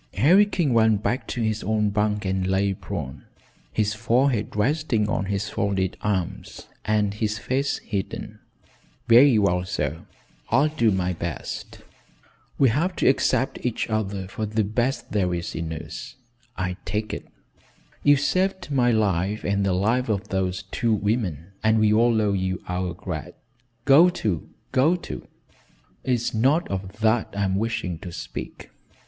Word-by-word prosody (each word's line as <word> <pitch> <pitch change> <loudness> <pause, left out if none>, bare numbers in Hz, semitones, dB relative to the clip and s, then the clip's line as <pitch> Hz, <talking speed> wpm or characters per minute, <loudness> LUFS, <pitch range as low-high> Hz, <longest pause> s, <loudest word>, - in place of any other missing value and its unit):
Harry 175 - +5
King 165 -10 0
went 110 -2 +3
back 125 +2 -1
to 120 - -2
his 110 -1 0
own 105 0 +1
bunk 105 0 0
and 95 0 0
lay 95 +1 +1
prone, - - -6 0.5
his 105 -1 0
forehead 115 +1 +1
resting 120 -1 +1
on 100 -2 -1
his 100 +1 -2
folded 95 -2 -1
arms 95 -4 -3 0.2
and 105 -1 +1
his 105 0 -1
face 130 +7 -1
hidden. 100 -3 -5 0.7
"Very 120 +1 +7
well, 90 -3 +2
sir; 80 -5 -3 0.4
I'll 140 +6 +4
do 150 -7 +2
my 90 -2 0
best. 85 -1 -6 0.7
We 135 - +5
have 165 +10 0
to - - +1
accept 135 0 +2
each 120 -2 -2
other 100 -3 -2
for 110 +2 -4
the 110 +1 0
best 120 +6 -1
there 90 -4 +1
is 85 0 -4
in 80 -1 -4
us, 80 - -7 0.4
I 90 -2 -2
take 105 0 -3
it. - - -6 0.7
You've 145 -1 +5
saved 185 0 0
my 125 -3 +3
life 105 -2 +1
and 100 0 +1
the 95 -1 +1
life 115 +7 +1
of 100 -1 -1
those 95 +1 -1
two 115 -2 +1
women, 100 - -2
and 110 0 +4
we 110 -1 +4
all 115 +1 +4
owe 105 -2 +2
you 95 -1 -2
our 90 -1 -2
grat 90 -1 -6 0.3
" 120 0 -43
"Go 150 +6 +7
to, 105 - -2 0.2
go 150 +7 +4
to. 175 - -7 0.8
It's 120 -2 0
not 135 +10 +2
of 95 +2 -5
that 110 +1 +2
I'm 100 -2 +1
wishing 100 -5 -2
to 90 - -8
speak. - - -7
105 Hz, 155 wpm, -24 LUFS, 95-120 Hz, 0.8 s, Very